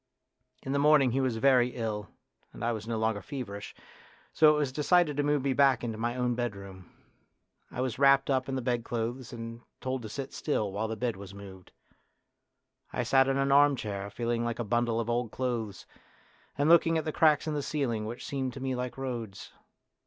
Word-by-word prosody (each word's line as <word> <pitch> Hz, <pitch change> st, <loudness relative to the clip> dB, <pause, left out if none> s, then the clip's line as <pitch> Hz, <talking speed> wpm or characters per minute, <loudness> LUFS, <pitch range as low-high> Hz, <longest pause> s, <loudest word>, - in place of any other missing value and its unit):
In 135 Hz, -, -4 dB
the 140 Hz, -, +1 dB
morning 145 Hz, -3 st, +5 dB
he 135 Hz, +3 st, +1 dB
was 130 Hz, -4 st, 0 dB
very 125 Hz, 0 st, +3 dB
ill 105 Hz, -4 st, -3 dB, 0.4 s
and 110 Hz, -, -5 dB
I 120 Hz, -, +1 dB
was 110 Hz, -1 st, -5 dB
no 115 Hz, -1 st, -2 dB
longer 110 Hz, -2 st, 0 dB
feverish, 100 Hz, -5 st, -7 dB, 0.6 s
so 155 Hz, +1 st, +6 dB
it 150 Hz, -, +1 dB
was 145 Hz, -3 st, 0 dB
decided 150 Hz, +2 st, +2 dB
to 145 Hz, -, +1 dB
move 145 Hz, -1 st, +1 dB
me 135 Hz, -1 st, +1 dB
back 135 Hz, -1 st, +3 dB
into 115 Hz, -2 st, -4 dB
my 120 Hz, +1 st, -1 dB
own 125 Hz, -1 st, 0 dB
bedroom. 100 Hz, -6 st, -6 dB, 0.8 s
I 125 Hz, -, -4 dB
was 130 Hz, -2 st, -2 dB
wrapped 140 Hz, 0 st, +5 dB
up 130 Hz, -1 st, 0 dB
in 135 Hz, -, -2 dB
the 130 Hz, -, -3 dB
bedclothes 120 Hz, 0 st, -2 dB
and 115 Hz, 0 st, -7 dB, 0.2 s
told 130 Hz, 0 st, -3 dB
to 110 Hz, -, -7 dB
sit 135 Hz, +5 st, -6 dB
still 110 Hz, -9 st, -1 dB
while 105 Hz, +3 st, -2 dB
the 110 Hz, -, -3 dB
bed 120 Hz, -3 st, -2 dB
was 100 Hz, 0 st, -10 dB
moved. 95 Hz, -2 st, -12 dB, 1.2 s
I 125 Hz, -, -1 dB
sat 135 Hz, +2 st, +4 dB
in 135 Hz, 0 st, +1 dB
an 135 Hz, 0 st, +1 dB
armchair, 120 Hz, -9 st, +2 dB
feeling 120 Hz, +2 st, -2 dB
like 120 Hz, -1 st, -2 dB
a 120 Hz, -, -2 dB
bundle 120 Hz, +1 st, 0 dB
of 115 Hz, -, -2 dB
old 120 Hz, 0 st, 0 dB
clothes, 115 Hz, -6 st, -3 dB, 0.7 s
and 145 Hz, +1 st, +2 dB
looking 165 Hz, 0 st, +5 dB
at 160 Hz, -, -2 dB
the 155 Hz, -, -1 dB
cracks 155 Hz, -2 st, +3 dB
in 155 Hz, -, -2 dB
the 145 Hz, -, -1 dB
ceiling 125 Hz, -8 st, -2 dB
which 120 Hz, +2 st, -7 dB
seemed 130 Hz, -2 st, -3 dB
to -, -, -8 dB
me 130 Hz, 0 st, -2 dB
like 125 Hz, 0 st, -4 dB
roads. 120 Hz, -7 st, -6 dB
125 Hz, 205 wpm, -29 LUFS, 115-135 Hz, 1.2 s, so